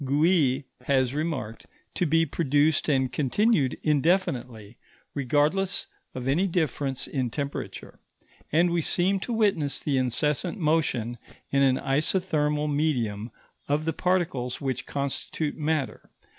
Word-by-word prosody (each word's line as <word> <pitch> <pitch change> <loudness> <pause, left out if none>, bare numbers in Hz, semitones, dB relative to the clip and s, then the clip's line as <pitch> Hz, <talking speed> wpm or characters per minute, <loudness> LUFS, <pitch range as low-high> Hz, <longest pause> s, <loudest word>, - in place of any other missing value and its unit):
Gouy 145 -1 +2 0.2
has 130 -2 +2
remarked, 145 -8 -3 0.3
to 180 - 0
be 165 +2 +3
produced 150 0 +1
and 130 -3 +2
continued 150 - +1
indefinitely, 130 - 0 0.3
regardless 150 +8 +1 0.3
of 130 0 -4
any 165 +9 +2
difference 150 -6 -1
in 130 -4 -2
temperature; 140 +3 -6 0.5
and 170 +3 +3
we 170 -1 +1
seem 185 +5 +2
to 240 - -5
witness 200 -11 +1
the 140 -3 0
incessant 150 - 0
motion, 145 - 0 0.3
in 140 - +3
an 130 -1 +4
isothermal 150 0 0
medium, 125 -8 -1 0.4
of 150 +2 0
the 165 - 0
particles 165 -9 -1
which 135 -3 -3
constitute 140 +2 -3
matter. 155 -3 -2
145 Hz, 120 wpm, -26 LUFS, 130-165 Hz, 0.5 s, an